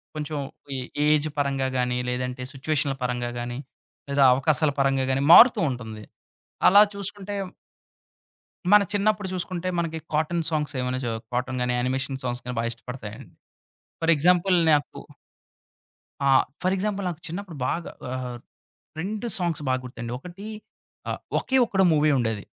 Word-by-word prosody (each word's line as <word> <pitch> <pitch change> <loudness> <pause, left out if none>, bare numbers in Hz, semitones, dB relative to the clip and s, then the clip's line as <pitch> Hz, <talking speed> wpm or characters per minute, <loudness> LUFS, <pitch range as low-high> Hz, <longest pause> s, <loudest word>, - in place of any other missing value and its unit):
కొంచెం 150 0 -4 0.4
ఏ - - -2 0.3
ఏజ్ 150 0 +3
పరంగా 135 -2 0
గాని, 125 0 0
లేదంటే 125 +1 -3
సిచ్యుయేషన్‌ల 140 0 -1
పరంగా 125 -1 -1
గాని, 120 0 -4 0.5
లేదా 140 0 +3
అవకాశాల 145 +3 +2
పరంగా 135 -1 +2
గాని, 135 +1 +1
మారుతూ 240 +5 +9
ఉంటుంది. 110 -4 -6 0.6
అలా 200 +2 +8
చూసుకుంటే 200 0 -5 1.4
మన 210 - +8
చిన్నప్పుడు 205 0 +1
చూసుకుంటే 185 0 -3
మనకి 165 -1 -2
కాటన్ 160 +2 0
సాంగ్స్ 150 -2 -1
ఏమైనా 125 0 -1
చ - - -1 0.3
కాటన్ 125 +1 -1
గాని 125 0 0
యానిమేషన్ 130 +2 -1
సాంగ్స్ 120 -1 -3
గాని 125 -1 -5
బాగా 115 0 -1
ఇష్టపడతాయండి. 115 -3 -9 0.7
ఫర్ 165 0 +3
ఎగ్జాంపుల్ 180 +4 +3 0.2
నాకు 145 -1 +1 1.3
ఆ! - - +4 0.3
ఫర్ 185 +1 +1
ఎగ్జాంపుల్ 200 0 -2
నాకు 170 -1 -7
చిన్నప్పుడు 175 -1 -6
బాగా 170 0 -3 0.2
ఆహ్, 125 -1 -4 0.6
2 210 +6 -4
సాంగ్స్ 170 -4 -1
బాగా 130 0 +1
గుర్తుండి. 120 -1 -7
ఒకటి 180 +8 -10 0.6
ఆ - - 0 0.3
'ఒకే 265 - 0
ఒక్కడు' 190 -3 +2
మూవీ 155 0 +3
ఉండేది. 110 -4 -1
145 Hz, 140 wpm, -25 LUFS, 125-175 Hz, 1.4 s, మారుతూ